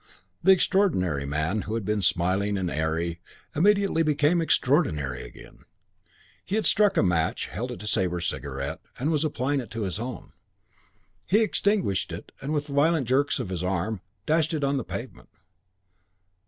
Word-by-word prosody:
The 190 - +6
extraordinary 95 - +2
man, 80 +9 -1
who 110 - -4
had 115 -4 -3
become 105 0 0
smiling 95 +3 +1
and 90 -2 -2
airy, 80 +2 -1 0.3
immediately 200 0 +3
became 155 +2 +2
extraordinary 90 - +1
again. - - -13 0.8
He 195 - -3
had 220 - 0
struck 205 -1 +4
a - - +4
match, 85 -4 +1
held - - -4
it - - -7
to - - -7
Sabre's 90 -4 0
cigarette, 70 -3 -4 0.2
and 145 +6 0
was 150 -2 +1
applying 145 -2 0
it 120 -5 -6
to 115 0 -4
his 95 +1 -3
own. 120 -3 -6 0.9
He 210 +4 +4
extinguished 205 - +1
it - - -8
with 145 +1 -1
violent 145 -1 +2
jerks 140 +3 +2
of - - -4
his 90 -2 -3
arm 95 +2 -1
and 105 - -6 0.3
dashed 160 0 +2
it 150 - -2
on 140 0 +2
to - - +1
the 130 - -2
pavement. - - -7
115 Hz, 170 wpm, -26 LUFS, -, 0.9 s, The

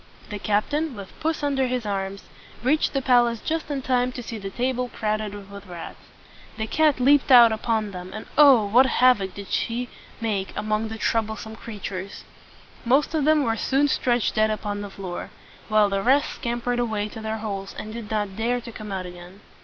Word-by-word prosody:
The 205 - -4
captain, 275 +9 0
with 200 -2 -9
puss 315 -1 -1
under 270 -2 +1
his 250 -2 -2
arm, 195 -1 -2 0.5
reached 295 +5 +2
the 275 -2 -1
palace 240 -3 +3
just 320 +3 -3
in 275 -3 -3
time 250 -1 +1
to 245 - -6
see 225 -1 -6
the 195 -1 -5
table 250 +3 -1
crowded 210 -2 -3
with 200 0 -10
rats. 175 -2 -9 0.6
The 220 - -2
cat 300 +3 +2
leaped 275 +2 +4
out 240 -2 +9
upon 220 -1 -1
them, 180 -1 -7
and 215 - -7
oh! 275 -7 +7
what 245 +6 +5
havoc 240 -7 +3
she 235 +5 -1
did - - -20 0.3
make 205 -4 -2
among 215 +1 -1
the 220 0 -6
trou 225 +1 +2
ble 220 0 -6
some 220 +1 -8
creatures! 200 -4 -7 0.6
Most 270 +6 +2
of 305 -3 +1
them 310 -1 +4
were 225 -3 +1
soon 275 +6 +2
stretched 245 -4 +1
dead 215 0 +3
upon 210 -1 -3
the 205 - -6
floor, 190 -2 -6 0.4
while 215 -1 +4
the 195 0 -1
rest 270 +6 +2
scam 235 0 -2
pered 245 0 0
away 220 -3 -1
to 220 - -9
their 220 0 -3
holes, 200 -3 -5
and 215 - -6
did 230 -2 -7
not 205 -3 -2
dare 235 +3 0
to 235 0 -9
come 215 -2 -8
out 190 -1 -3
again. 180 +2 -11
225 Hz, 200 wpm, -24 LUFS, 205-250 Hz, 0.6 s, out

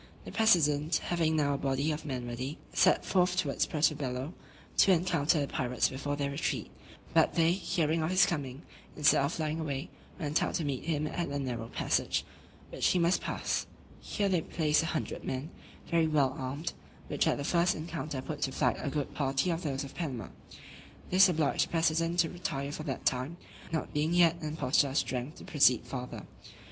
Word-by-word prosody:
The - - -7
president, 155 -8 +3
having 165 -2 0
now 145 -2 +2
a 140 - -2
body 140 +3 0
of 155 +1 -4
men 130 -4 -3
ready, 130 +5 -4 0.2
set - - +4
forth 180 -1 +2
towards 145 -6 +1
Puerto 155 0 +2
Bello, 135 +2 -4 0.4
to 195 - +6
encounter 165 -3 +2
the 140 - 0
pirates 125 -2 0
before 140 +2 -3
their 140 -1 -2
retreat; 140 - -2 0.4
but, - - +4
they, 165 0 +4
hearing 165 -3 0
of 155 - 0
his 185 0 +5
coming, 140 -3 -4 0.3
instead 150 -2 +5
of 140 - 0
flying 155 0 -2
away, 140 -3 -4 0.3
went 150 -3 0
out - - -1
to 165 - -1
meet 135 -3 -3
him 155 -2 0
at 170 +2 -2
a 140 - -2
narrow 120 -4 -3
passage, - - 0 0.5
which - - +1
he - - +3
must 170 +1 +2
pass: - - -2 0.3
here 205 -2 -1
they 185 -4 +2
placed 155 -1 +1
a 165 - -2
hundred 165 - -3
men, 135 +4 -4 0.4
very 165 -1 +3
well 140 -4 +2
armed, 140 +6 -4 0.3
which - - 0
at - - +2
the 145 - -3
first 170 +4 +2
encounter 155 -4 -5
put 150 +1 -6
to 135 - 0
flight 130 -2 +1
a - - -2
good 145 0 -3
party 135 +4 0
of 165 0 -2
those 140 -3 -2
of 140 - -9
Panama. 135 -9 -4 0.8
This 185 +1 +7
obliged 155 -5 +1
the - - -20
president 165 +1 +1
to 165 - -1
retire 160 -6 -3
for 150 - -5
that 135 -4 -5
time, 130 +7 0 0.3
not 160 - -3
being 155 +3 +1
yet 170 -1 +4
in 155 -1 -3
a - - -10
posture 140 0 +3
of 135 - -2
strength 130 +3 -2
to - - -11
proceed 130 -5 +4
farther. 125 0 -6
150 Hz, 200 wpm, -30 LUFS, 135-165 Hz, 0.8 s, This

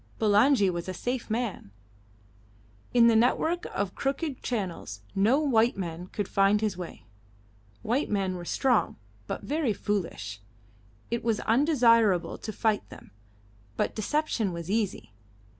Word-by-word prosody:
Bulangi 215 +1 +4
was 175 +1 -5
a 185 - -4
safe 245 +3 -3
man. 220 - -3 1.2
In 240 -1 +5
the 230 -1 +5
network 315 +9 +2
of 200 -2 -3
crooked 275 0 -2
channels 180 - -4
no 220 +9 +3
white 245 -7 +2
man 175 -1 -5
could 205 +1 -4
find 200 +1 +3
his 215 -3 -1
way. 175 -9 -8 0.8
White 250 +7 0
men 195 -3 0
were 175 - -6
strong, 245 +6 +1 0.3
but - - -4
very 290 -5 0
foolish. 165 - -3 0.7
It 235 - -1
was 225 -2 +1
undesirable 230 - +3
to 215 - -5
fight 215 0 0
them, - - -13 0.7
but - - 0
deception 225 -3 -1
was 170 +2 -5
easy. 200 - -2
215 Hz, 135 wpm, -28 LUFS, 190-245 Hz, 1.2 s, In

